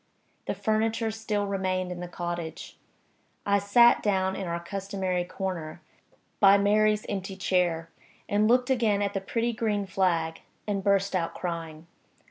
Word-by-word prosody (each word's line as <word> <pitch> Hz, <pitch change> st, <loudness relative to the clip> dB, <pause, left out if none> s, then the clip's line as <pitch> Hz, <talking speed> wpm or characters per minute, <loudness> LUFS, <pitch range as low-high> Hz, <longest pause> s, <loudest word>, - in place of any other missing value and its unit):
The -, -, -1 dB
furniture 220 Hz, +2 st, 0 dB
still 215 Hz, -2 st, -2 dB
remained 185 Hz, -2 st, -1 dB
in 180 Hz, -, -6 dB
the 180 Hz, -, -5 dB
cottage. 175 Hz, -2 st, -5 dB, 0.7 s
I 200 Hz, 0 st, +3 dB
sat 235 Hz, +4 st, +5 dB
down 190 Hz, -2 st, +1 dB
in 190 Hz, -, -4 dB
our 170 Hz, 0 st, -2 dB
customary 190 Hz, 0 st, -3 dB
corner, 175 Hz, -3 st, -5 dB, 0.6 s
by 200 Hz, 0 st, +7 dB
Mary's 210 Hz, +1 st, +2 dB
empty 195 Hz, -1 st, -4 dB
chair, 175 Hz, -4 st, 0 dB, 0.4 s
and 210 Hz, +1 st, +2 dB
looked 250 Hz, +2 st, +3 dB
again 220 Hz, -5 st, +2 dB
at 200 Hz, 0 st, -1 dB
the 195 Hz, -, -2 dB
pretty 235 Hz, +4 st, -1 dB
green 210 Hz, -3 st, -1 dB
flag, 170 Hz, -4 st, 0 dB, 0.2 s
and 200 Hz, -2 st, -2 dB
burst 200 Hz, -1 st, +2 dB
out 170 Hz, -2 st, -1 dB
crying. 165 Hz, -2 st, -5 dB
195 Hz, 145 wpm, -27 LUFS, 180-210 Hz, 0.7 s, by